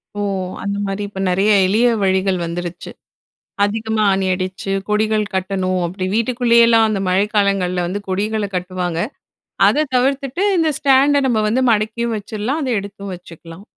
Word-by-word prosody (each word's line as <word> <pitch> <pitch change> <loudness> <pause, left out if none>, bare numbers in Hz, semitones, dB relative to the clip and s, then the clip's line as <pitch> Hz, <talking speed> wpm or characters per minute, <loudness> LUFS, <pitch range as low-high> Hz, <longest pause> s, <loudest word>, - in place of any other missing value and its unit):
ஓ! - - -5 0.4
அந்த 200 0 -2
மாரி 195 +1 -3
இப்ப 195 -1 -9
நெறைய 195 +4 +2
எளிய 220 +6 +3 0.2
வழிகள் 190 0 +1
வந்துடுச்சு. 175 +1 -6 0.7
அதிகமா 220 +1 -1
ஆணி 190 0 0
அடிச்சு 185 +1 -4 0.2
கொடிகள் 215 0 +1
கட்டணும். 185 -1 -1
அப்படி 185 +2 -5
வீட்டுக்குள்ளயெல்லாம் 235 -1 +4
அந்த 210 -2 -1
மழை 190 +3 +2
காலங்கள்ல 190 -3 +1
வந்து 195 +4 -3
கொடிகள 205 +2 -1
கட்டுவாங்க. 180 -2 -3 0.7
அத 305 +1 +2
தவிர்த்துட்டு 275 +7 0
இந்த 325 -1 +2
ஸ்டாண்ட 280 +1 +4
நம்ம 225 -3 +1
வந்து 255 +4 +1
மடக்கியும் 220 +2 -1
வச்சிருலாம், 220 +9 -3
அத 265 - -2
எடுத்தும் 200 0 -8
வச்சுக்கலாம். 175 +2 -13
205 Hz, 140 wpm, -18 LUFS, 185-230 Hz, 0.7 s, வீட்டுக்குள்ளயெல்லாம்